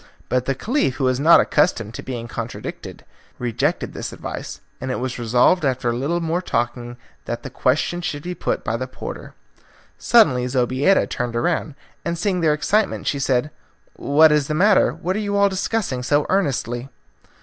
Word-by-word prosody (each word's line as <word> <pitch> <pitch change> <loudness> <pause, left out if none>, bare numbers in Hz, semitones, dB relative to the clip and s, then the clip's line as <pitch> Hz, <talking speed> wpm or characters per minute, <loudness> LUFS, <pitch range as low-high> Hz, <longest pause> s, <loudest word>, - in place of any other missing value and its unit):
But 125 0 +1
the 135 - 0
Caliph, 215 - 0
who 135 - -3
was 130 0 +2
not 165 +4 +7
accustomed 115 - +1
to - - -6
be 120 -3 -5
contradicted, - - -7 0.3
rejected 120 -3 -1
this - - -5
advice, - - -7 0.2
and 130 - -4
it 130 - -2
was 130 0 -4
resolved 125 +9 +3
after 130 -3 0
a - - -2
little 145 +8 -1
more 170 +1 -1
talking 120 -5 -3 0.3
that 120 0 -4
the 135 - -7
question 155 +8 0
should 150 -4 -4
be 180 - -4
put - - -2
by - - -1
the - - -4
porter. - - -8 0.6
Suddenly 135 - +4
Zobeida 130 +8 +2
turned 120 -2 -3
round, 155 +2 -1 0.3
and 170 0 -2
seeing 180 0 0
their 155 -2 +3
excitement 205 +7 0
she 140 - -1
said, 135 +2 0 0.4
"What 155 +2 +4
is 150 -2 +2
the 150 - -2
matter 200 +4 +4
what 185 +3 -3
are - - -1
you 205 -1 -1
all 200 0 +4
discussing 190 - -2
so 145 +3 +1
earnestly?" 135 -8 -1
145 Hz, 180 wpm, -21 LUFS, 125-175 Hz, 0.6 s, not